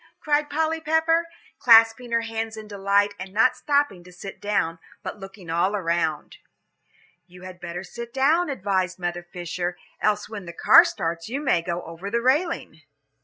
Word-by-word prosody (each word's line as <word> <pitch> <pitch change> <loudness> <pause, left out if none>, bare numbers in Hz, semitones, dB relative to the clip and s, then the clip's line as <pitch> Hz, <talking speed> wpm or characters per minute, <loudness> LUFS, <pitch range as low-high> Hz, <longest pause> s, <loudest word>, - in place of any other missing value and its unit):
cried 295 -1 +1
Polly 320 +2 0
Pepper, 320 +2 +2 0.3
clasping 230 +1 +5
her 230 0 +2
hands 225 -1 -4
in 215 -1 -8
delight, 200 0 +1
and 190 +1 -7
not 225 +5 +3
stopping 285 -11 0
to 180 - -15
sit 190 +2 -10
down, 195 -5 -1 0.2
but 210 - -6
looking 195 -1 -11
all 170 +5 +1
around. 165 -5 -1 0.9
"You 180 0 -15
had 185 -1 -10
better 175 +1 -6
sit 235 +5 -8
down," 300 +7 +2
advised 190 -7 -1
Mother 175 -1 -3
Fisher, 175 0 -5 0.2
"else 210 -1 +1
when 205 -4 -8
the 170 - -7
car - - +7
starts 165 +3 -3
you 265 +4 -2
may 270 - +2
go 175 +1 -4
over 165 +4 -7
the 235 - 0
railing." 300 +7 0
205 Hz, 170 wpm, -24 LUFS, 175-250 Hz, 0.9 s, car